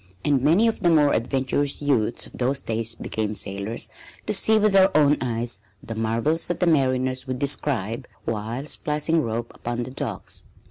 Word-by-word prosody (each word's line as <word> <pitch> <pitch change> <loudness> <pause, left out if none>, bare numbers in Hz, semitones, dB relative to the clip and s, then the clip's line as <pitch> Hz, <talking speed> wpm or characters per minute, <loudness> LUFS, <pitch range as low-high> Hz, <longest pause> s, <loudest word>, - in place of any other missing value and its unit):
And 140 -3 +3
many 170 - +4
of 225 - 0
the 175 - +3
more 150 -3 +4
adventurous 135 +4 0
youths 125 -6 +1
of - - -14
those 130 +2 0
days 115 0 -2
became 110 -1 -3
sailors 100 +3 -2 0.4
to - - -1
see 220 0 +4
with 215 0 +3
their 190 0 +6
own 145 -1 +5
eyes 120 -1 -2 0.2
the 115 - -5
marvels 115 +8 0
that 175 - -2
the 180 - +2
mariners 130 -4 +1
would 130 0 -2
describe, 130 -4 -1 0.2
while 115 +4 -3
splicing 150 +2 +1
rope 115 -1 -3
upon 120 0 -4
the 130 - -7
docks. 130 -7 -5
130 Hz, 175 wpm, -24 LUFS, 115-150 Hz, 0.4 s, their